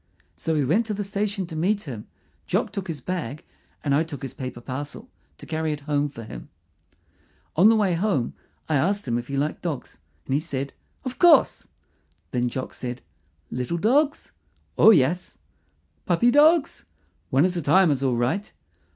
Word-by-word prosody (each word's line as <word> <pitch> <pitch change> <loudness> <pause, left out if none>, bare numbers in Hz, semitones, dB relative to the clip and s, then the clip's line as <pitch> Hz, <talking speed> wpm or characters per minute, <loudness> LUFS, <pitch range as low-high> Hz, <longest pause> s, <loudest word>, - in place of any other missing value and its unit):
So 160 -1 -2
we 145 -3 +2
went 210 - +2
to 210 - -2
the 205 - -2
station 200 0 -2
to 165 -2 -8
meet 200 +6 +1
him. 120 -8 -7 0.4
Jock - - 0
took 195 -1 -5
his 155 -5 -5
bag, 155 -4 -4 0.4
and 140 - +1
I 150 +3 +3
took 150 -3 -8
his 135 - -5
paper 130 -3 -6
parcel 145 - -7 0.3
to - - -11
carry 160 -1 -1
it 150 - -7
home 145 0 0
for 115 -5 -9
him. - - -9 1.1
On 185 +7 +7
the 225 - +5
way 205 -4 +2
home 170 - 0 0.3
I 155 - +2
asked 195 +5 0
him 120 0 0
if 120 - -8
he 140 - -3
liked 145 +2 -1
dogs, 160 -7 -5 0.3
and - - -2
he 140 - +3
said, 140 -4 -4 0.3
"Of 255 0 -5
course." 345 -2 +5 0.6
Then 125 -1 0
Jock 130 +2 -5
said, 125 0 -5 0.5
"Little 125 +7 -2
dogs?" 280 - +2 0.4
"Oh, - - +7
yes." 175 -1 +3 0.7
"Puppy 210 +8 +4
dogs?" 305 +3 +4 0.4
"One 135 +5 +4
at 185 0 0
a 170 - -1
time 170 +3 +4
is 135 -2 0
all 130 -3 +1
right." 125 - -1
160 Hz, 180 wpm, -24 LUFS, 135-200 Hz, 1.1 s, On